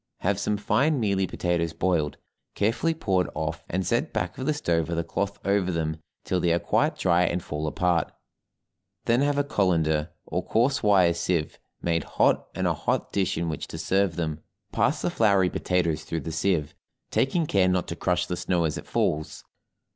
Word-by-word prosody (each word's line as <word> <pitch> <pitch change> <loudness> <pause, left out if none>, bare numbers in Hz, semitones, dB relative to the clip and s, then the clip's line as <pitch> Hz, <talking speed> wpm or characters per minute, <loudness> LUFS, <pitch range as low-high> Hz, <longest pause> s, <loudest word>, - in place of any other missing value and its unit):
Have 100 +1 +1
some 105 +1 0
fine 140 +8 +2
mealy 100 -4 +1
potatoes 85 -2 -1
boiled, 80 -4 0 0.4
carefully 115 +11 +1
poured 95 - 0
off, 80 0 -3
and 95 +1 -1
set - - 0
back 90 0 -2
of 130 - -3
the 155 - +3
stove 85 - 0
with 85 - -2
a 85 - +1
cloth 100 +4 -2
over 100 -2 +2
them 80 -2 -2 0.3
till 90 - 0
they 85 -1 +2
are 85 - +3
quite - - +1
dry 85 -1 +3
and 85 0 -1
fall 75 +1 -3
apart; 85 0 +1 0.9
then 120 +3 +3
have 145 0 +1
a 145 - +3
colander, 85 - +1 0.2
or 90 - -2
coarse 120 +9 +1
wire 95 -5 +4
sieve 85 -2 -1 0.2
made 85 -2 +1
hot - - +3
and - - -1
a - - +3
hot - - -1
dish 95 -4 0
in 85 +1 -1
which 80 -2 -4
to - - -7
serve 95 +2 +1
them, 80 -3 -2 0.3
pass - - +1
the - - 0
floury 100 -5 +3
potatoes 85 -4 0
through 80 - -3
the 80 - -5
sieve, 80 -2 0 0.4
taking 160 +5 +1
care 95 -9 +3
not 90 -1 +1
to 85 - -4
crush 90 0 0
the 90 - -3
snow 90 -1 0
as 80 -2 -1
it - - -12
falls. 75 +1 -1
90 Hz, 190 wpm, -26 LUFS, 85-100 Hz, 0.9 s, wire